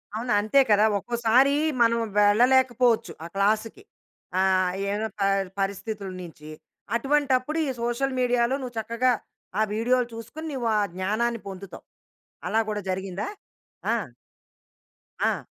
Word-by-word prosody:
అవును, 240 +2 -3
అంతే 215 +7 +4
కదా! 210 0 +5
ఒక్కోసారి 240 +5 +3 0.3
మనం 230 0 +4 0.2
వెళ్ళలేకపోవచ్చు 240 0 +4
ఆ - - -5
క్లాస్‌కి. 215 - 0 0.6
ఆహ్, 185 -1 +3 0.2
ఏమైన 210 +2 -1
పరి 195 -1 +1
పరిస్థితుల 200 +1 -3
నించి, 155 -3 -11 0.5
అటువంటప్పుడు 275 +2 +1
ఈ - - -1
సోషల్ 255 +3 -1
మీడియాలో 245 0 +2
నువ్వు 250 -2 -7
చక్కగా 235 +3 +1 0.5
ఆ - - +4
వీడియోలు 245 +3 +1
చూస్కోనీ, 230 +8 -8
నీవు 245 -3 -2
ఆ - - +3 0.2
జ్ఞానాన్ని 220 +5 -1
పొందుతావు. 195 0 -9 0.6
అలా 220 - +2
కూడా 210 - -2
జరిగిందా? 190 +3 -3 0.6
ఆ! - - +3 1.3
ఆ! - - 0
230 Hz, 120 wpm, -25 LUFS, 200-250 Hz, 1.3 s, కదా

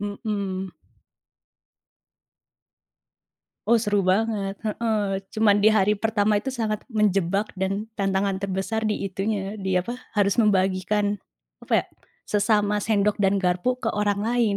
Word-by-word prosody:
Mhm. 200 -2 -4 2.9
Oh, 235 +1 +4
seru 205 -3 +1
banget. 205 -2 -1
Heeh, 210 -3 -1
cuma 215 -2 +4
di 215 +1 +4
hari 210 0 +3
pertama 210 0 +1
itu 265 +6 -2
sangat 220 -4 -2
menjebak 200 -1 +1
dan 195 +3 -2
tantangan 195 -1 0
terbesar 195 +3 -2
di 210 -2 -1
itunya, 195 +1 -3
di 190 -2 -3
apa, 240 +7 -5 0.2
harus 200 -2 +2
membagikan, 205 -1 +2 0.5
apa - - -7
ya, - - -10 0.4
sesama 210 0 +2
sendok 210 -1 +1
dan 195 -1 +2
garpu 180 +6 +1
ke 225 - -1
orang 205 -2 0
lain. 225 -2 +1
205 Hz, 125 wpm, -24 LUFS, 195-215 Hz, 2.9 s, Oh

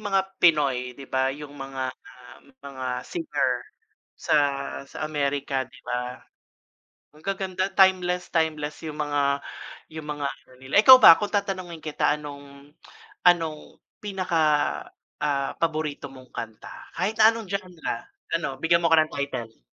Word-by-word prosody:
mga 195 -2 +2 0.2
Pinoy 140 -8 +3
di 135 +2 -12
ba? 130 0 +1
yung 145 0 -10
mga, 135 -1 -4
um, 125 0 -13 0.2
mga 135 -2 -8 0.2
singer 335 -3 -1 0.6
sa - - 0 0.5
sa - - -13
Amerika 140 -2 -1
di - - -18
ba? 125 +1 -4 0.9
Ang 155 - -18
gaganda 190 0 -2
timeless 180 -2 +3
timeless 155 -2 -1
yung 155 -1 -6
mga 145 -1 +1 0.6
yung 155 -1 -7
mga 145 -1 -3
ano 130 - -8
nila. 130 +1 -8
Ikaw 260 +3 +11
ba 165 - +10
kung 205 -1 -2
tatanungin 185 -5 -3
kita 155 - +1
anong 140 -1 -11 0.5
anong 165 -3 +2 0.2
pinaka, 185 -5 -1 0.8
ah, 140 -2 0
paborito 155 -4 -2
mong 130 -1 -14
kanta? 110 -2 -8
Kahit 215 - 0
na 220 - +9
anong 225 -1 -6
genre? 185 -4 -3 0.4
Ano? 150 -5 -2
Bigyan 170 +2 +3
mo 165 - +3
ko 165 - +7
ng 155 0 +2
title. 130 -5 -5
150 Hz, 140 wpm, -25 LUFS, 135-180 Hz, 0.9 s, Ikaw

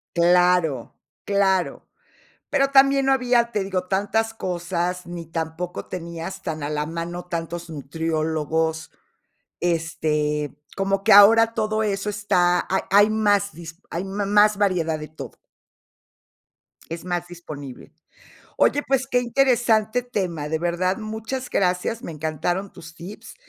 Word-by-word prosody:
Claro, 175 -6 +3 0.3
claro. 195 -2 +1 0.7
Pero 275 -1 +2
también 275 0 +5
no 270 - +3
había, 245 -2 +2
te 210 -3 -1
digo, 185 -1 -3
tantas 220 +4 0
cosas, 180 -2 -3
ni 170 -1 -7
tampoco 165 +2 -4
tenías 170 +2 -6
tan 155 -3 -4
a 145 - -2
la 150 0 -1
mano 170 +2 -5
tantos 170 0 -5
nutriólogos, 160 +1 -2 0.7
este, 150 -4 -1 0.2
como 195 0 0
que 215 - +5
ahora 225 +3 +7
todo 215 -1 0
eso 200 0 -1
está 180 -4 +1
hay 190 - +1
hay 205 +2 +6
más 205 -2 +2
dispo 165 +2 -11
hay 170 +3 -3
ma 200 +1 -3
más 210 +1 +4
variedad 170 -6 +1
de 155 - -8
todo. 155 - -9 1.6
Es 165 +1 -6
más 175 -1 -2
disponible. 150 -7 -10 0.7
Oye, 290 - +3
pues 265 -1 +1
que 245 - +3
interesante 240 -2 +2
tema, 180 -11 -3
de 160 - 0
verdad 175 +2 0
muchas 225 +4 -5
gracias, 185 +5 0
me 170 - -6
encantaron 160 +5 -2
tus 165 0 -12
tips, 205 +5 -10
180 Hz, 135 wpm, -23 LUFS, 165-210 Hz, 1.6 s, ahora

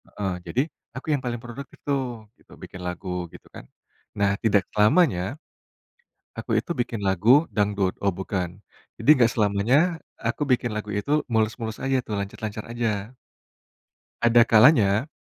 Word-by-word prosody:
Heeh, 95 -3 -4
jadi 120 +10 +1 0.3
aku 125 - -8
yang 140 - 0
paling 120 -1 -2
produktif 120 +3 -9
tuh 140 -1 +1 0.6
bikin 90 - -9
lagu 90 +2 -6 0.3
gitu - - -14
kan, - - -10 0.5
nah 100 0 +2
tidak 105 -3 +3 0.2
lamanya 110 - +4 1.2
aku - - -6
itu - - -6
bikin 120 -1 -4
lagu 95 +3 +1 0.3
dangdut 100 -2 +1
oh 100 - +3
bukan 95 -2 -2 0.5
jadi - - -2
enggak 120 -4 +4
selamanya 105 +2 +2 0.5
aku 115 +5 -2
bikin 120 -1 +1
lagu 105 0 -4
itu 105 +8 -3 0.2
mulus-mulus 110 0 -1
aja 135 0 +1
tuh 105 - -4
lancar-lancar 105 +2 -5
aja. 115 -2 -2 1.1
Ada 120 0 +5
kalanya, 110 -1 +5
110 Hz, 140 wpm, -24 LUFS, 100-120 Hz, 1.2 s, Ada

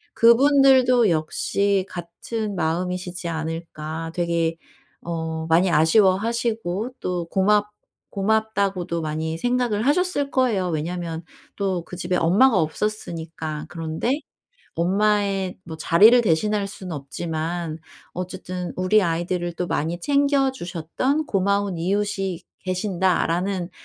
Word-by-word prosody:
그분들도 255 -1 +5
역시 190 +5 0
같은 195 +5 -5
마음이시지 180 +1 -2
않을까? 160 0 -5
되게 170 -1 0 0.4
어 160 -1 -4
많이 170 +3 +3
아쉬워하시고 215 +5 +2
또 180 -2 -2
고맙 210 +2 +2 0.4
고맙다고도 200 -4 0
많이 160 +1 -3
생각을 245 -1 0
하셨을 300 -2 +1
거예요 220 -9 +1
왜냐하면 165 +1 -3 0.3
또 190 -4 -1
그 - - -8
집에 180 +1 -1
엄마가 200 +6 +4
없었으니까. 160 -3 -3
그런데 165 - -2 0.6
엄마의 195 +1 +1
뭐 160 -2 -7
자리를 210 +10 +6
대신할 205 +2 +1
수는 190 -3 -7
없지만 160 +3 -4 0.4
어쨌든 180 0 -5
'우리 185 +3 +3
아이들을 175 +1 -1
또 175 +1 -3
많이 165 +3 -1
챙겨 280 0 +2
주셨던 255 - -2
고마운 200 -1 0
이웃이 195 0 -1 0.2
계신다.'라는 185 -1 0
185 Hz, 270 characters per minute, -23 LUFS, 165-210 Hz, 0.6 s, 자리를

